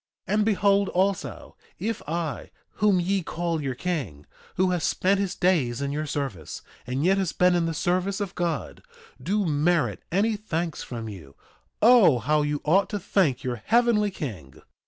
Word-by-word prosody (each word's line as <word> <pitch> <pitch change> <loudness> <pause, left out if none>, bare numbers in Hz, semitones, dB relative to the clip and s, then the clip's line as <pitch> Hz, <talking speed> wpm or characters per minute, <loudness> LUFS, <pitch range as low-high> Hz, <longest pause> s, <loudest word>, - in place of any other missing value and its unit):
2:19 190 - -1
And 210 0 +3
behold 200 -2 +2
also, 190 +1 -2 0.2
if 220 +5 -3
I, 165 -2 -3 0.3
whom 205 -3 +3
ye 190 +2 0
call 170 -1 -2
your 135 -3 -3
king, 135 - -4 0.3
who 185 0 +2
has 175 -2 -1
spent 195 +1 +1
his 195 -2 -2
days 145 -10 +1
in 140 0 -2
your 150 +2 -3
service, 135 - -4 0.2
and 130 +5 -1
yet 195 +2 +3
has 180 -5 -1
been 180 0 +3
in 170 -1 +1
the 165 - -2
service 185 +4 0
of 200 -3 -3
God, 170 -4 -3 0.4
do 200 +8 0
merit 150 - +1
any 210 +5 +2
thanks 170 -6 -3
from 115 -2 -6
you, 85 -10 -10 0.5
O 225 - +7
how 150 +6 +1
you 145 0 -1
ought 190 +6 +3
to 205 - -2
thank 155 -9 +1
your 120 -4 -3
heavenly 230 - +3
King! 105 - -8
175 Hz, 175 wpm, -25 LUFS, 140-195 Hz, 0.5 s, O